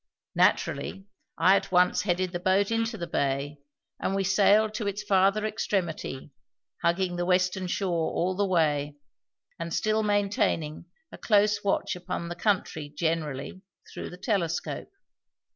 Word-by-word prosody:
Naturally, 165 +7 +1 0.3
I 185 +4 +5
at 195 - -1
once 180 0 +4
headed 185 -2 0
the 175 - -3
boat 190 +3 +2
into 230 0 0
the 170 - -4
bay, 140 -2 -2 0.4
and 195 - -1
we 195 - +1
sailed 205 +3 +4
to 215 -2 -3
its 200 +1 -3
farther 195 +2 +3
extremity, 175 -10 -3 0.5
hugging 175 +1 +1
the 175 - 0
western 180 0 +1
shore 175 -3 -1
all 185 +2 0
the 205 - +1
way, 150 -5 +1 0.6
and 165 0 -4
still 215 +5 +1
maintaining 200 -7 0 0.3
a - - -11
close 210 -1 +3
watch 200 -2 0
upon 180 -1 -5
the 175 - -5
country 175 -6 -1
generally 155 +1 -3 0.3
through - - -6
the 180 - -10
telescope. 180 -6 -2
185 Hz, 145 wpm, -27 LUFS, 165-200 Hz, 0.6 s, I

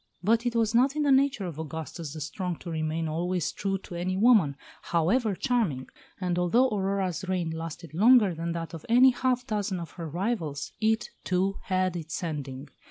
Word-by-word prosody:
But 230 +4 +2
it 240 - -2
was 225 -1 +2
not 260 +4 +3
in 305 - +1
the 285 - +3
nature 270 -5 +3
of 165 -4 -6
Augustus 160 0 -6
the 155 - -7
Strong 175 +4 -3
to 175 - -6
remain 160 0 -1
always 175 +1 -1
true 195 0 -2
to 185 - -12
any 180 +2 -2
woman, 205 - +5 0.3
however 195 +6 +1
charming; 205 - 0 0.3
and 180 -2 -1
although 235 +9 +3
Aurora's 195 -5 -1
reign 175 -3 -1
lasted 165 0 -7
longer 210 +1 +5
than 165 +1 -3
that 165 0 -5
of 165 - -7
any 250 +3 +7
half 250 0 0
dozen 205 -5 -2
of 170 - -7
her 165 -3 -7
rivals, 170 -5 -2
it, 220 +1 +1
too, 190 +2 0
had 185 -1 0
its 165 0 -5
ending. 140 -4 -5
185 Hz, 185 wpm, -28 LUFS, 165-225 Hz, 0.3 s, any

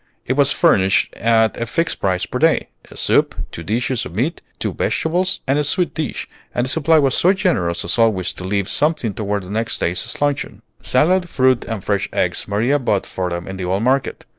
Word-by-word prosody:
It 130 - 0
was 140 0 +4
furnished 95 0 +3
at 110 -1 +2
a 115 - -1
fixed 165 +8 -1
price 90 -1 0
per 125 - -4
day, 160 0 +2 0.2
a - - -13
soup, - - +2 0.2
two - - -7
dishes 115 +6 -1
of 85 - -8
meat, 135 - -1 0.2
two - - -3
vegetables, 180 +4 -1
and 140 +2 +1
a - - +1
sweet 175 +5 0
dish; 155 -3 -4 0.3
and 120 - +1
the - - -3
supply 160 +2 +3
was 135 -4 +3
so 185 +3 +4
generous 165 - 0
as 85 - -1
always 105 -6 +2
to - - -9
leave 100 +1 -1
something 150 -8 0
toward 100 -1 -2
next 110 +3 -2
day's 85 +1 -2
luncheon. 140 -7 -2 0.2
Salad, 175 +7 +2
fruit, 130 -3 +2
and 110 -5 -5
fresh 100 -1 -1
eggs - - -1
Maria 115 +8 +1
bought 105 -7 0
for 90 -1 -3
them 85 0 -5
in 95 0 -6
the 95 - -4
old 95 +4 0
market. 130 +2 0
115 Hz, 205 wpm, -19 LUFS, 100-145 Hz, 0.3 s, was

